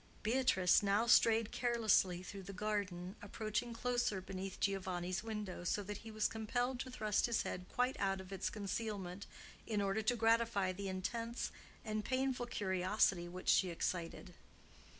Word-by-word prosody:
Beatrice 215 -6 +4
now 205 +2 +2
strayed 230 -2 +5
carelessly 220 -7 +2
through 195 +2 -7
the 195 +1 -8
garden, 195 -3 -2
approaching 215 +3 -2
closer 240 -3 0
beneath 190 0 -6
Giovanni's 185 -2 -1
window, 210 -5 -4
so 205 +3 0
that 205 +1 -5
he 225 - -10
was 215 -1 +1
compelled 245 +3 -1
to 260 - -4
thrust 215 -4 +1
his 235 - +1
head 180 0 -5
quite 250 +1 0
out 195 -1 +1
of 190 +1 -8
its 195 - -1
concealment 200 -2 -4 0.4
in 215 -2 0
order 200 +2 +1
to 220 +3 +2
gratify 225 -4 +3
the 195 +1 -4
intense 230 +5 -3 0.3
and 215 0 -2
painful 255 -1 0
curiosity 190 -3 +1
which 185 +1 -8
she 185 - +5
excited. 170 +1 -3
205 Hz, 150 wpm, -37 LUFS, 185-230 Hz, 0.4 s, strayed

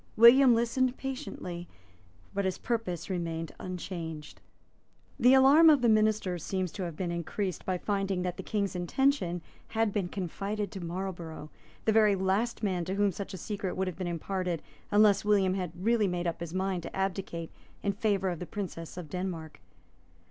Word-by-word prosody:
William 240 +2 +8
listened 245 +2 +1
patiently; 180 -10 -5 0.7
but 200 - 0
his 190 -1 -1
purpose 200 -8 -2
remained 165 -3 -3
unchanged. 165 -4 -6 0.8
The 250 +2 +7
alarm 285 +5 +8
of 290 -5 +5
the 235 - +5
ministers 215 -5 +2
seems 185 -3 -2
to 190 - -5
have 170 -3 -5
been 180 -2 -2
increased 170 +1 -3
by 185 -1 +1
finding 195 -1 -1
that 180 -1 -2
the - - -6
King's 200 -3 -2
intention 180 - +1 0.2
had 225 -2 0
been 200 -4 0
confided 200 +3 -3
to 190 -4 -6
Marlborough, 170 -3 -5 0.3
the 220 - +4
very 215 -2 +5
last 195 +5 0
man 185 -4 0
to 190 - -2
whom 205 0 +3
such 195 +1 -6
a - - -6
secret 195 +1 -4
would 190 - +1
have 185 -3 -4
been 185 - -2
imparted 175 0 -2 0.3
unless 205 -1 +5
William 200 -3 +3
had 180 -3 -2
really 215 +2 +2
made 180 -1 -2
up 170 -1 -2
his 170 -2 -5
mind 185 0 -1
to - - -8
abdicate 190 -3 -3 0.3
in 200 - +1
favour 200 -2 +1
of 175 -3 -3
the 180 - -6
Princess 180 -5 -6
of 175 -3 -6
Denmark. 170 -2 -5
190 Hz, 175 wpm, -30 LUFS, 175-210 Hz, 0.8 s, William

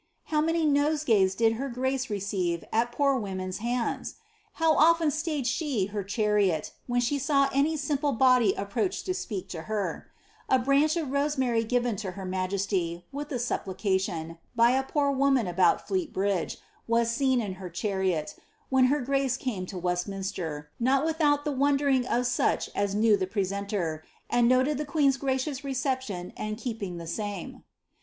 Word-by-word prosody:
How 305 -1 0
many 325 +1 +1
noeegays 285 -10 +3
did 225 -1 +3
her 275 - -2
grace 260 +1 -1
leeeive 190 -5 -2
at 235 +2 +2
poer 275 +2 +2
women's 185 -4 -4
hands! 240 +2 -2 0.4
How 325 -1 +3
often 330 -1 +4
stayed 305 -3 -2
she 255 - 0
her 205 -2 -2
chariot, 200 -5 +1 0.2
when 245 0 +1
she 280 +4 0
saw 275 0 +3
wtf 290 +4 +1
simple 290 0 0
body 250 -4 +4
approach 200 - -2
to 370 - -1
speak 210 - -5
to 160 -2 -6
herf 215 -2 -2 0.4
A 260 - +5
branch 280 +5 +3
ofroaeibaiy 275 -6 0
gmBla 225 -6 -1
her 195 -1 -6
majesty, 185 -2 -2
with 290 +2 -6
a 260 - -1
supplication, 190 -7 -2 0.2
by 235 +1 +5
a 265 +1 +2
poor 280 +1 0
woman 270 -3 +2
aboni 245 - +1
Flnit - - -21
hiiiJM 195 -3 -1 0.3
was 230 0 +2
seen 260 +1 +2
in 205 -5 -3
her 180 - -6
chariot, 185 -3 -1 0.3
when 265 -1 +4
her 285 +3 +2
grace 270 0 0
came 205 -10 -3
to 185 - -6
Westminster, 180 -4 -3
not 265 +4 +2
w»* 320 -1 0
out 290 0 +1
the 300 - 0
wondering 275 -2 +2
of 245 0 +1
such 240 0 0
as 200 0 -1
knew 215 0 +4
the 190 -2 -2
presenter, 195 -5 -2 0.3
and 240 -1 +4
noted 260 +3 +3
the 300 - -2
qiasrt 280 -3 +2
gracious 270 +1 -1
reception 260 -9 -3
and 215 0 -4
keqwsg 215 -7 -4
the 170 - -7
same." 205 +1 -5
240 Hz, 165 wpm, -28 LUFS, 195-275 Hz, 0.4 s, A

